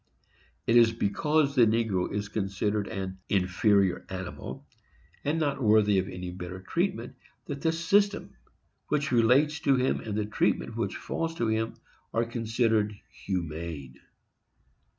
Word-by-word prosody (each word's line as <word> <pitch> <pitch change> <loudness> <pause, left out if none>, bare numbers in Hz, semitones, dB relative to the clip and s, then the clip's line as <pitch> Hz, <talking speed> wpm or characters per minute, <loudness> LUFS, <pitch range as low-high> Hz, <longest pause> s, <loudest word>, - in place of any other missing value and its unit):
It 115 - +4
is 115 -1 +6
because 140 +7 +1
the 120 -5 +5
negro 110 -5 +1
is 105 0 -2
considered 100 0 -1
an 95 -2 -5
inferior 95 0 +2
animal, 95 -1 -6 0.6
and 150 +3 0
not 140 -3 -1
worthy 105 -3 +4
of 95 +1 -3
any 90 0 -6
better 90 +1 -7
treatment, 95 - -2 0.3
that 140 -1 -5
the 165 - +2
system 200 +5 +1 0.5
which 150 -1 0
relates 130 +6 +4
to 140 - +3
him 130 +1 +1
and 105 -2 -4
the 105 - 0
treatment 105 - 0
which - - -2
falls 165 0 -3
to 120 - -1
him 110 +1 -1 0.4
are 115 +1 +2
considered 115 -2 0 0.2
humane. 80 -7 -5
110 Hz, 135 wpm, -28 LUFS, 95-135 Hz, 0.6 s, is